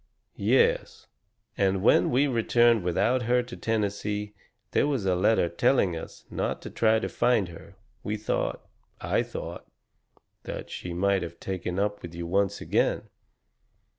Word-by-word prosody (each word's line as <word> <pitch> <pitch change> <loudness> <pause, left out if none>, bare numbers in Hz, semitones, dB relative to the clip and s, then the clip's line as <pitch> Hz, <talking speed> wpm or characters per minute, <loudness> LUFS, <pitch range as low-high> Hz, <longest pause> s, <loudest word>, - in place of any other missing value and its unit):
"Yes, 475 -1 +2 0.5
and 95 -1 +1
when - - +5
we 130 +4 +3
returned 120 -3 +3
without 115 +9 +1
her 125 0 +3
to 120 0 -9
Tennessee 105 -1 -2 0.4
there - - +2
was 135 -9 -1
a 95 - +3
letter 95 +1 +3
telling 90 +1 +2
us 80 - -9
not - - -2
to - - -7
try 110 -1 +3
to 110 - -2
find 115 -7 +1
her. 85 +3 -12 0.3
We 105 +1 -3
thought 105 - -2 0.3
I - - +1
thought - - -7 0.7
that - - -7
she 90 - -6
might 100 +2 +2
have 85 0 -7
taken 90 -1 -4
up 105 +1 -1
with 85 -1 -9
you 85 0 -5
once 100 +3 0
again." - - 0
105 Hz, 150 wpm, -27 LUFS, 95-120 Hz, 0.7 s, when